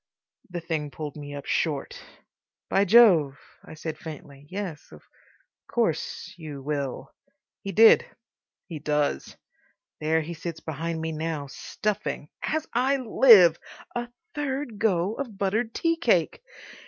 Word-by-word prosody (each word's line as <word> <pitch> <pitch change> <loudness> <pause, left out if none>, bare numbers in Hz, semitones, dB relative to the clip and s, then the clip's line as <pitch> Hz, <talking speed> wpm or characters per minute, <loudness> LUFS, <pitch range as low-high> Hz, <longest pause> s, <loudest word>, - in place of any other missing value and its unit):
The 175 -1 -5
thing 160 -3 -3
pulled 150 0 -7
me 145 -1 -7
up 140 - -7
short. 150 -4 -1 0.7
"By 195 - +4
Jove!" 180 - +6 0.3
I - - -11
said 155 0 -6
faintly. 145 -3 -10
"Yes. 185 -6 -6
Of - - -14 0.6
course—you 165 - -3
will." 140 -2 -4 0.5
He 195 - -5
did. 225 +2 +7 0.6
He 160 -3 -7
does. 150 - -1 0.6
There 160 +1 +1
he 165 +2 -6
sits 165 0 -6
behind 160 +1 -4
me 160 0 -2
now, 155 -2 -3
stuffing—as 210 - -3
I 260 +4 +2
live!—a 235 -1 +4 0.2
third 270 -6 -3
go 190 -2 +1
of 235 -6 -6
buttered 220 +4 0
tea 330 +6 0
cake. 340 - +1
170 Hz, 120 wpm, -26 LUFS, 150-220 Hz, 0.7 s, did